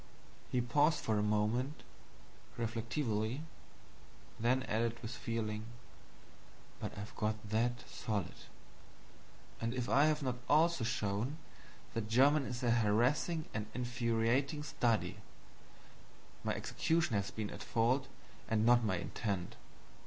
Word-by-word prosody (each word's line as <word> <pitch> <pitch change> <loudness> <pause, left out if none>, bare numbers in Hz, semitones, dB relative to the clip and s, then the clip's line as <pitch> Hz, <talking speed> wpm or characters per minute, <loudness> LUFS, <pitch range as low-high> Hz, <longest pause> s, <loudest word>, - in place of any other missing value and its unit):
He 125 - +2
paused 145 +6 +3
for 110 -2 +1
a - - +2
moment, 105 +7 0 0.7
reflectively; 115 +2 -1 1.0
then 125 +3 +2
added 115 0 0
with 110 - -4
feeling: 110 -3 -3 1.1
"But - - -5
I've 105 +2 -7
got 110 0 -2
that 120 +2 0
SOLID!" 105 -5 -3 1.3
And 115 +2 -1
if 125 -1 -1
I 140 +3 +5
have 155 -1 +2
not 125 -2 -1
also 160 -2 +4
shown 110 +5 -1 0.6
that 110 -2 -3
German 135 +4 +5
is 125 0 -4
a 120 - +3
harassing 120 +9 +2
and 105 -1 -3
infuriating 125 +4 +1
study, 115 - 0 1.3
my - - 0
execution 160 -6 0
has 100 0 0
been 110 -2 -4
at - - -8
fault, 125 +4 +1 0.4
and 110 -1 +2
not 120 0 +6
my 105 -4 +1
intent. 95 0 -3
115 Hz, 120 wpm, -35 LUFS, 110-130 Hz, 1.3 s, not